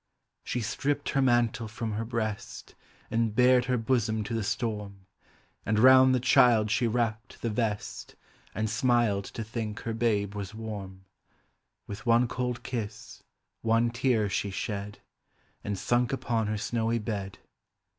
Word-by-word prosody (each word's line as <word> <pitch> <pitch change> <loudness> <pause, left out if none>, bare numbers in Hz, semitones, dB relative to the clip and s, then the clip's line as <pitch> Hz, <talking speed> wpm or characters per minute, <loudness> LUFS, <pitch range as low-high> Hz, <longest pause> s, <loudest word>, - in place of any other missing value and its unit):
She 125 - -2
stripped 140 +6 -1
her 140 - +1
mantle 120 -3 +2
from 110 +1 -4
her 105 +2 -2
breast, 110 -3 -4 0.4
And 115 -2 0
bared 125 0 +5
her 125 -1 +1
bosom 110 -2 0
to 115 - -5
the 115 - 0
storm. 105 -3 -3 0.6
And 105 +1 0
round 130 +2 +7
the - - +1
child 120 -4 +4
she 120 +1 +2
wrapped 115 -1 -2
the 115 - 0
vest, 105 -2 -3 0.4
And 110 +2 0
smiled 120 -4 +1
to 115 - -6
think 110 -1 -5
her 115 - -3
babe 105 -3 0
was 100 0 -6
warm. 100 -4 -7 0.8
With 105 +4 -8
one 120 +1 +4
cold 125 0 -3
kiss, 115 -4 -6 0.4
one 115 +1 +2
tear 120 -3 +1
she 100 +1 -1
shed, 100 +2 -5 0.6
And 100 -1 -3
sunk 120 +5 +1
upon 115 -5 -1
her 105 0 -1
snowy 115 +2 -1
bed. 100 -3 -4
115 Hz, 145 wpm, -28 LUFS, 105-120 Hz, 0.8 s, round